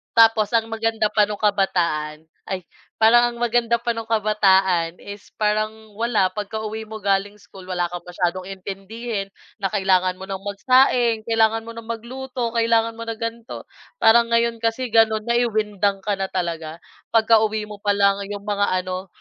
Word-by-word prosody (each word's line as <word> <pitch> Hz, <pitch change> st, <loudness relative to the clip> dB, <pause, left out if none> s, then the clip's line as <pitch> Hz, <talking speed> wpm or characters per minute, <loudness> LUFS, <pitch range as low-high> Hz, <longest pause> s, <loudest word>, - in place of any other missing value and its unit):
Tapos 225 Hz, -2 st, +5 dB
ang 225 Hz, 0 st, +2 dB
maganda 225 Hz, -1 st, 0 dB
pa 210 Hz, -, +4 dB
nung 210 Hz, -1 st, -5 dB
kabataan 170 Hz, -7 st, 0 dB, 0.2 s
ay 185 Hz, -1 st, -4 dB, 0.4 s
parang 240 Hz, +2 st, +5 dB
ang 235 Hz, -, -11 dB
maganda 235 Hz, 0 st, +2 dB
pa 235 Hz, 0 st, -1 dB
nung 225 Hz, -1 st, -6 dB
kabataan 190 Hz, -6 st, +2 dB
is 200 Hz, 0 st, -10 dB
parang, 215 Hz, +1 st, -1 dB
wala, 225 Hz, -5 st, +2 dB
pagkauwi 220 Hz, +1 st, -5 dB
mo 220 Hz, 0 st, -7 dB
galing 200 Hz, +1 st, 0 dB
school, 195 Hz, -2 st, -14 dB
wala 175 Hz, -1 st, 0 dB
kang 175 Hz, -1 st, -6 dB
masyadong 180 Hz, +1 st, -2 dB
intindihin 195 Hz, +3 st, -5 dB, 0.3 s
na 195 Hz, -, +1 dB
kailangan 185 Hz, -1 st, +2 dB
mo 190 Hz, -, -8 dB
nang 195 Hz, -1 st, -4 dB
magsaing, 235 Hz, +2 st, +2 dB
kailangan 225 Hz, 0 st, +2 dB
mo -, -, -6 dB
nang 230 Hz, -1 st, -9 dB
magluto, 245 Hz, +1 st, -5 dB
kailangan 230 Hz, 0 st, +2 dB
mo 230 Hz, -, -6 dB
na 230 Hz, -, -3 dB
ganito. 230 Hz, +1 st, -5 dB, 0.4 s
Parang 235 Hz, +1 st, +6 dB
ngayon 230 Hz, 0 st, +1 dB
kasi, 230 Hz, +3 st, 0 dB
gano'n, 220 Hz, -1 st, +3 dB
ay, 240 Hz, 0 st, +3 dB
windang 205 Hz, -2 st, 0 dB
ka 205 Hz, -, 0 dB
na 195 Hz, -, -1 dB
talaga. 165 Hz, -3 st, -3 dB, 0.4 s
Pagkauwi 220 Hz, -1 st, +3 dB
mo 210 Hz, -1 st, -10 dB
pa 205 Hz, -, +2 dB
lang, 200 Hz, 0 st, +3 dB
yung 205 Hz, -1 st, -6 dB
mga 200 Hz, -3 st, 0 dB
ano, 185 Hz, +1 st, -5 dB
215 Hz, 165 wpm, -22 LUFS, 195-230 Hz, 0.4 s, Parang